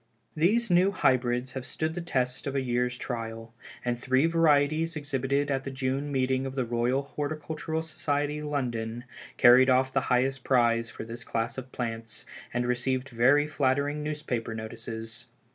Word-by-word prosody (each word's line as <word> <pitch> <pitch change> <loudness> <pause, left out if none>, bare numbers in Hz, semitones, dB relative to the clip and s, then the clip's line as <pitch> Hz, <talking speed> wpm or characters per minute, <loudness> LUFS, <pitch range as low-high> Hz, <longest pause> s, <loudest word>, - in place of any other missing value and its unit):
These 205 +8 +2
new 180 +2 +5
Hybrids 125 -7 +1
have 130 -1 -5
stood 155 +4 -3
the 175 - -4
test 130 -5 -1
of 140 - -3
a 135 - +2
year's 125 -1 0
trial, 115 -2 -5 0.3
and 120 -1 -1
three 130 +3 +2
varieties 160 -1 +3
exhibited 140 -1 -1
at 135 -1 0
the 135 - -4
June 135 +2 -2
meeting 130 0 +1
of 135 - -7
the 130 -2 0
Royal 120 +3 0
Horticultural 155 +3 -4
Society, 150 -1 -1
London, 120 -6 -3 0.3
carried 125 +2 +7
off 130 +1 +3
the 135 - +2
highest 130 +1 +1
prize 115 -3 +2
for - - -7
this 115 +1 -7
class 115 0 -2
of 130 0 -11
plants, 115 -2 -5 0.3
and 120 0 -1
received 130 +2 0
very 130 +5 +4
flattering 145 0 0
newspaper 145 -7 -3
notices. 115 0 -6
130 Hz, 160 wpm, -28 LUFS, 120-145 Hz, 0.3 s, carried